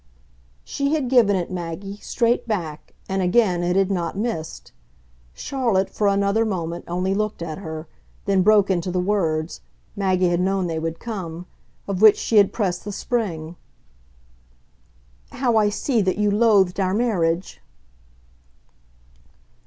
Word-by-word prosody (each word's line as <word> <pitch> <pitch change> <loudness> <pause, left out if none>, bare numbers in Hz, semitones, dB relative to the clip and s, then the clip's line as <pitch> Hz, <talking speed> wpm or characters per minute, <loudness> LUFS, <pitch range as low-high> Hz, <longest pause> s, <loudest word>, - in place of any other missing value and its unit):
She 280 +2 -1
had 275 -5 -1
given 225 -6 +5
it, 180 -1 -2
Maggie, 185 +3 -5
straight 235 +3 0
back, 165 -9 -4
and 190 0 -1
again 180 -1 +2
it 175 +1 0
had 195 0 +2
not 175 -1 -2
missed. 200 -8 -4 0.6
Charlotte, 230 - -1
for 210 - 0
another 200 +2 +2
moment, 175 -5 -3
only 180 +2 -1
looked 215 -3 -2
at 160 0 -5
her; 160 -3 -7 0.4
then 195 -2 +2
broke 205 0 +4
into 180 -1 -1
the 180 0 -1
words 170 -5 -1 0.3
Maggie 185 -3 +1
had 175 0 +1
known 190 0 0
they 165 -2 -2
would 165 0 -3
come 180 -7 -6 0.4
of 195 -1 -3
which 215 -2 +8
she 225 - 0
had 200 -2 +6
pressed 185 -5 -2
the 205 - -5
spring. 175 -8 -3 1.8
"How 250 -3 0
I 210 -1 +4
see 230 +3 0
that 185 -2 0
you 210 0 +2
loathed 200 -4 +3
our 190 0 +1
marriage!" 185 - 0
195 Hz, 145 wpm, -22 LUFS, 175-215 Hz, 1.8 s, which